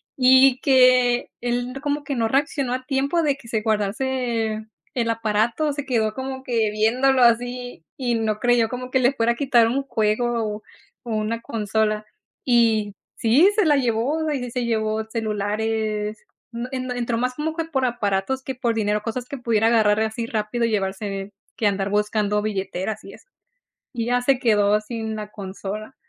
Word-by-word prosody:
Y 260 0 +6
que 255 -2 +4
él 245 +1 -2
como 290 0 -2
que 280 - -2
no 230 -2 +1
reaccionó 275 -1 0
a 255 0 -4
tiempo 280 +5 +1
de 290 -3 +2
que 235 - -16
se 220 -2 0
guardase 220 +1 -1 0.3
el 235 -2 -1
aparato, 230 +6 0
se 285 0 -5
quedó 225 -5 0
como 265 +1 -5
que 230 -4 +1
viéndolo 250 +5 +3
así 245 -3 +1
y 245 -3 0
no 220 -2 -1
creyó 240 -1 +3
como 250 +1 -5
que 260 - +3
le 250 +2 +3
fuera 235 -2 +1
a - - -11
quitar 245 -4 +3
un 265 +4 -1
juego 220 -2 0
o 215 - -18 0.4
o 240 - -9
una 215 +2 -2
consola. 215 -1 -1 0.4
Y 225 -4 +3 0.2
sí, 270 - +5
se 425 -3 +3
la 300 -2 +4
llevó, 270 +6 0
ahí 290 -3 -1
sí 245 - -5
se 250 0 -2
llevó 220 -1 0
celulares, 215 0 -2 0.3
en 235 +1 -4
en 255 -1 -3
entró 235 -1 -1
más 250 +2 -1
como 310 +3 -2
que 330 -1 -2
por 280 -5 -1
aparatos 240 +2 -1
que 265 - -5
por 240 -2 -1
dinero, 210 -1 0
cosas 240 +2 -4
que 280 - -6
pudiera 225 -2 +1
agarrar 215 -2 +3
así 220 +1 -2
rápido 225 +1 -2
y - - 0
llevarse 195 -1 -2
de 195 +1 -5 0.3
que 220 - +2
andar 195 -1 0
buscando 210 0 +1
billeteras 200 0 -3
y - - -11
eso. - - -17 0.7
Y 230 -2 -2
ya 245 0 +2
se 265 +1 +3
quedó 210 -4 +3
sin 220 0 -5
la 210 -1 -6
consola, 205 +3 -7
230 Hz, 180 wpm, -23 LUFS, 215-255 Hz, 0.7 s, Y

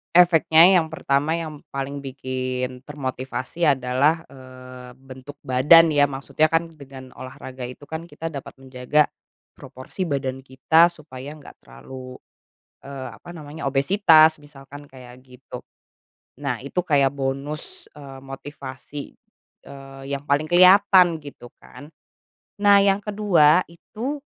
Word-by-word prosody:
Efeknya, 170 -1 +6
yang 160 -3 +1
pertama, 155 +1 -1
yang 155 -3 -8
paling 140 +1 -5
bikin 130 -1 -5
termotivasi 135 +2 -6
adalah, 140 +4 +1
eee, 130 -1 -13
bentuk 130 +2 -13
badan. 145 +6 +5
Ya, 145 -2 +2
maksudnya 140 +3 0
kan 165 +1 +1
dengan 135 -5 -14
olahraga 130 0 -10
itu 125 +4 -9
kan 160 +1 -6
kita 165 -1 -8
dapat 140 -4 -9
menjaga 130 +3 0 0.5
proporsi 130 +9 -8
badan 135 -5 -3
kita 160 +6 +3
supaya 145 -4 -10
enggak 150 -1 -14
terlalu, 130 - -11 0.6
eee, 135 -2 -8
apa 175 - -14
namanya, 155 -2 -10
obesitas, 155 +1 +4
misalkan 145 0 -14
kayak 125 -1 -14
gitu. 130 0 -12 0.8
Nah, 125 -5 -2
itu 140 +7 -4
kayak 140 -4 +1
bonus, 145 - -5
eee, 135 -2 -11
motivasi, 135 0 -9 0.6
eee, 135 -1 -12
yang 140 - -3
paling 145 +2 +1
kelihatan 185 +1 +5
gitu 145 -5 -12
kan. 145 - -14 0.7
Nah, 200 -1 +5
yang 200 0 +1
kedua 185 -6 +3
itu 225 - -6
140 Hz, 125 wpm, -22 LUFS, 130-160 Hz, 0.8 s, Efeknya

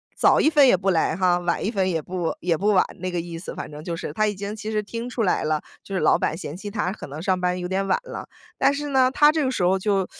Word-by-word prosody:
早 - - +4
1 310 - +4
分 290 -3 +6
也 220 - +5
不 190 +2 -1
来 160 -2 +1
哈， 180 -1 +2
晚 175 -1 -1
1 - - +1
分 190 -4 0
也 165 -3 0
不 180 +1 -3
也 170 -1 +1
不 200 - -1
晚。” 200 -3 +5 0.2
那 185 0 -3
个 175 - -2
意 170 -1 -7
思 180 - -7
反 - - -6
正 150 +1 -9
就 170 -1 -3
是， - - -5
他 215 +5 +1
已 210 - -1
经 200 +2 -5
其 220 0 -5
实 215 - 0
听 230 +3 -5
出 240 - -3
来 185 - +1
了， 155 -1 0 0.2
就 195 - -9
是 185 - 0
老 - - +4
板 155 - 0
嫌 150 -4 -6
弃 205 +2 -6
他 205 -4 -1
可 200 - -8
能 145 +3 -7
上 185 -2 +1
班 180 0 0
有 180 - -3
点 195 +1 -1
晚 - - +2
了。 - - -7 0.3
但 275 - +4
是 290 +1 -4
呢， 260 -2 +4
他 295 +2 +5
这 310 -1 0
个 260 - 0
时 230 - -2
候 185 +2 +3
就 195 -1 0
190 Hz, 320 characters per minute, -23 LUFS, 175-215 Hz, 0.3 s, 分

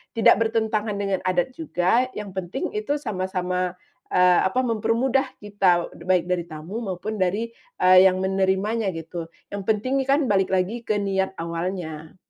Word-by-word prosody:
tidak 225 - +6
bertentangan 220 -2 0
dengan 195 -2 -1
adat 185 +6 +1
juga, 245 - +1
yang 210 -2 -6
penting 180 -1 -4
itu 215 +8 -1
sama-sama, 185 -3 -2 0.4
eee, 180 -1 +5
apa 250 +7 -1
mempermudah 250 +4 +1 0.2
kita, 190 -4 +2 0.2
baik 185 -2 +3
dari 175 -1 +1
tamu 160 +7 -6
maupun 205 +2 -4
dari, 205 +5 0 0.3
eee, 185 +1 +8
yang 185 0 0
menerimanya 195 +3 +1
gitu. 165 +1 -6 0.2
Yang 200 -1 -4
penting 240 +6 +1
nih 270 - -2
kan, 280 - +5
balik 195 -1 +3
lagi 190 +6 0
ke 215 - +1
niat 190 -1 -1
awalnya. 165 -2 -5
190 Hz, 150 wpm, -24 LUFS, 180-220 Hz, 0.4 s, eee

